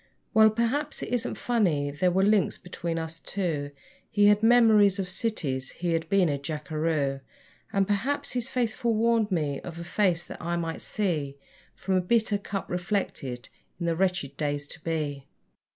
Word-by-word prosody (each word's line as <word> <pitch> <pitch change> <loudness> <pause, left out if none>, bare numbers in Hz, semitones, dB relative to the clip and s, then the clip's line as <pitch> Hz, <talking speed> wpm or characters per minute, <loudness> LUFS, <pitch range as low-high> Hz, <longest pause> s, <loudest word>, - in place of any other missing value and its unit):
Well, 220 0 +7
perhaps, 235 +7 -1
it - - -5
isn't 245 0 -1
funny; 170 -12 +1
there 165 +6 +1
were 190 +2 +2
links 205 0 +3
between 170 -2 -4
us 165 0 -4
two 165 -8 -2 0.4
He 205 0 +3
had 210 0 +4
memories 220 -4 +5
of 190 -2 -2
cities, 170 - -1
he 170 -1 -2
had 165 0 -1
been 195 -3 +4
a 145 -2 -1
jackeroo; 150 -1 -2 0.5
And, 195 -1 +2
perhaps, 270 +9 0
his 245 0 -1
face 240 -4 0
forewarned 230 -1 +1
me 150 -6 0
of 170 -2 -8
a 170 - -6
face 175 -1 +1
that - - -10
I 170 0 -1
might 165 -1 -3
see 155 -9 -2 0.4
From 195 - -2
a 185 - +3
bitter 215 +2 +1
cup 200 -1 -4
reflected 175 - -3 0.3
in 170 - -2
the 165 -1 +1
wretched 180 -6 0
days 145 -1 -1
to 160 - -5
be. 150 -4 -3
180 Hz, 170 wpm, -27 LUFS, 155-215 Hz, 0.5 s, Well